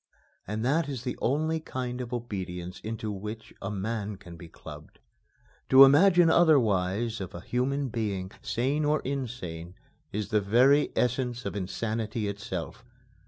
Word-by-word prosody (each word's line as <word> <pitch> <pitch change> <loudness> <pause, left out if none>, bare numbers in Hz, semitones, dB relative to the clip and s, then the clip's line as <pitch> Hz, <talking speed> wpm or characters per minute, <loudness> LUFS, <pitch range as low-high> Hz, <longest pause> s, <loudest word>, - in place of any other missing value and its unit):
And 110 +3 -2
that 145 +3 +1
is 130 -4 -5
the 125 - -3
only 155 +5 +1
kind 125 -4 -4
of 120 -1 -6
obedience 95 -7 -5
into 110 -1 -4
which 105 +3 -7
a 95 - -3
man 105 +1 -3
can 90 -3 -12
be 85 0 -11
clubbed. 75 -2 -12 0.7
To 130 +1 +10
imagine 170 +5 +6
otherwise 115 - +3
of 95 -1 -6
a 85 - -7
human 135 +5 -1
being, 100 -5 -3
sane 135 +6 0
or 150 +1 +2
insane, 110 -11 -5 0.4
is 105 0 -3
the 105 -1 +2
very 130 +8 +4
essence 125 0 0
of 100 - -3
insanity 110 +2 -2
itself. 100 +1 -5
115 Hz, 145 wpm, -28 LUFS, 100-130 Hz, 0.7 s, To